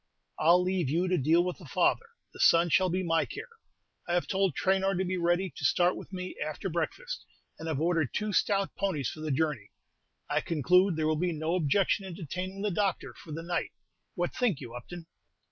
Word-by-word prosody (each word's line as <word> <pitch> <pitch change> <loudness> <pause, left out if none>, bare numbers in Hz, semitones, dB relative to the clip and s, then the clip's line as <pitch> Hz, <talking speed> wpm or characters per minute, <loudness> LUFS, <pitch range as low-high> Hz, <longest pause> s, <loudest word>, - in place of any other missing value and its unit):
"I'll 175 +3 +5
leave 180 -6 0
you 170 +5 +1
to 185 - +2
deal 165 +3 +3
with 180 -1 -4
the - - -12
father; 465 - +1 0.3
the - - -13
son 170 +1 +5
shall 185 +5 +3
be 185 +2 -1
my 165 -2 +2
care. - - -7 0.6
I 175 - +1
have 175 - +1
told 190 -5 0
Traynor 195 0 +2
to 190 +2 0
be 185 +1 -1
ready 175 0 +1
to - - -8
start 180 +1 +3
with - - -10
me 185 -1 -5
after 155 +5 -4
breakfast, - - -3 0.4
and 160 - -6
have 155 -4 -1
ordered 165 -4 +1
two 210 0 -2
stout 195 -1 +1
ponies 175 -10 -1
for - - -10
the 155 0 -4
journey. 145 -7 -1 0.6
I - - +1
conclude 180 +4 +3
there 155 0 0
will 155 0 +1
be 175 +1 0
no 155 +2 -2
objection 185 +4 +2
in 185 -3 -7
detaining 185 +4 -5
the 210 - 0
doctor 195 0 -1
for 160 - -13
the 165 +2 -5
night: 175 0 -2 0.4
what 175 0 -1
think 225 - +1
you, 120 -4 -9
Upton?" 165 +8 -8
175 Hz, 210 wpm, -29 LUFS, 160-190 Hz, 0.6 s, I'll